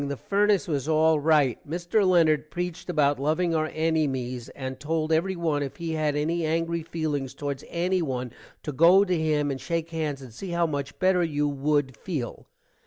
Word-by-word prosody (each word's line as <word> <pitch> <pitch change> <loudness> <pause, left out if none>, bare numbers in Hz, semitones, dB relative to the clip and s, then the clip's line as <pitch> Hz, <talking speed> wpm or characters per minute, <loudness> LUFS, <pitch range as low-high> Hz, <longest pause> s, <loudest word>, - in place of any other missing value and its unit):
the 140 -1 -3
fernace 205 +2 +1
was 150 -2 -2
all 160 0 +4
write. 145 -5 +2
Mister 175 +6 0
Lennard 160 -5 +3
preeched 175 +1 -5
about 145 -4 +2
loving 160 +4 +1
our 155 -1 0
ennymies, 135 -7 -1
and 130 -1 -6
told 155 +1 -1
every 185 +4 +1
one 160 -4 0
if 140 -2 -4
he 170 -1 -4
had 155 -2 0
any 165 +3 0
angry 165 +1 0
feelings 150 -5 -3
towards 140 -1 -4
ennyone 170 -9 -1 0.3
to 150 - -3
go 170 +8 +6
to 185 -3 0
him 150 -3 +1
and 135 - -5
shake 165 -1 -3
hands 155 -4 -2
and 130 -4 -11
see 185 - -7
how 170 0 +1
much 140 -3 -4
better 185 -1 +3
you 150 -3 0
wood 145 -2 0
feel. 135 - -5
155 Hz, 180 wpm, -26 LUFS, 145-170 Hz, 0.3 s, go